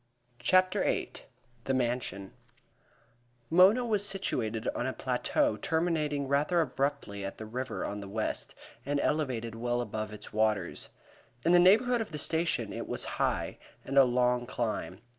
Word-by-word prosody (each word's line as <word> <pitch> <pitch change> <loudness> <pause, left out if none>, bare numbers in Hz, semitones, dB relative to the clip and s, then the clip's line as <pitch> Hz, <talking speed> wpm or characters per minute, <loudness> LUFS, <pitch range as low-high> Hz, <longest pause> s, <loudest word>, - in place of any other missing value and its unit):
CHAPTER 185 0 +3
VIII - - 0 0.5
The 135 - +1
Mansion 120 -6 -2 1.2
Mona 190 +8 +6
was 210 -4 +1
situated 125 - -1
on 120 - -2
a 130 - -2
plateau 290 - 0
terminating 155 -4 0
rather 145 +6 +2
abruptly 140 -9 -1
at 95 - -5
the 110 - -7
river 125 +4 -4
on 105 - -4
the 100 -1 -8
west, 110 +2 -3 0.3
and 145 +2 -1
elevated 130 -8 -1
well 120 +1 -1
above 110 -2 -4
its 105 0 -9
waters. 110 -1 0 0.6
In 170 - +4
the 175 - +7
neighborhood 225 +7 +5
of 220 - -5
the 150 - -4
station 155 -8 0
it - - -5
was - - -1 0.2
high, - - -1 0.3
and 135 - -4
a 135 - +9
long 125 -1 +1
climb. 110 -5 -3
130 Hz, 150 wpm, -30 LUFS, 110-165 Hz, 1.2 s, a